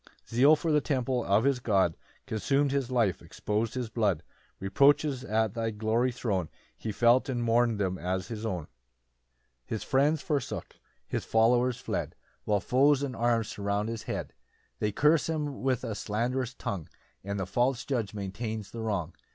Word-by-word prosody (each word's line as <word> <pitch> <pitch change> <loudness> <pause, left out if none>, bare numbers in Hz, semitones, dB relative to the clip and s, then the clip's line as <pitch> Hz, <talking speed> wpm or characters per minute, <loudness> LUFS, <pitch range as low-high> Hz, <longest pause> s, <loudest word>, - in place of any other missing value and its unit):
] - - -34
4 - - -25
[Zeal 140 +6 +7
for 160 +1 -1
the 150 -1 +4
temple 130 -4 0
of 100 +3 +3
his 135 -1 +2
God 100 -8 +2 0.3
Consum'd 140 +6 +1
his 135 -3 0
life, 115 -7 +1
expos'd 110 +3 -2
his 125 -2 -2
blood: 100 -8 +1 0.4
Reproaches 140 +6 +3
at 110 -3 0
thy 115 -1 -1
glory 110 +4 +1
thrown 100 -9 -2 0.3
He 110 - -4
felt, 120 +5 +4
and 120 -2 -1
mourn'd 115 -1 +3
them 95 -2 -1
as 95 0 -2
his 110 -2 -6
own.] 95 -7 -2
5 - - -30 1.0
[His 110 - -3
friends 145 +3 +2
forsook, 145 -4 -3 0.3
his - - -2
followers 120 +2 +3
fled, - - -3 0.3
While 105 -2 +2
foes 140 +5 +3
and 130 -3 -3
arms 115 -2 +1
surround 100 +1 -1
his 115 -1 -4
head; - - -3 0.5
They 105 - 0
curse 150 +7 +3
him 150 -3 -2
with 130 -3 0
a 110 - -3
slanderous 120 +4 -2
tongue, 90 -6 -4 0.3
And 100 +1 -3
the 95 - -1
false 120 +5 0
judge 115 -7 -2
maintains 105 +2 -4
the 115 - -6
wrong. 95 -7 -2
115 Hz, 175 wpm, -29 LUFS, 105-130 Hz, 1.0 s, Zeal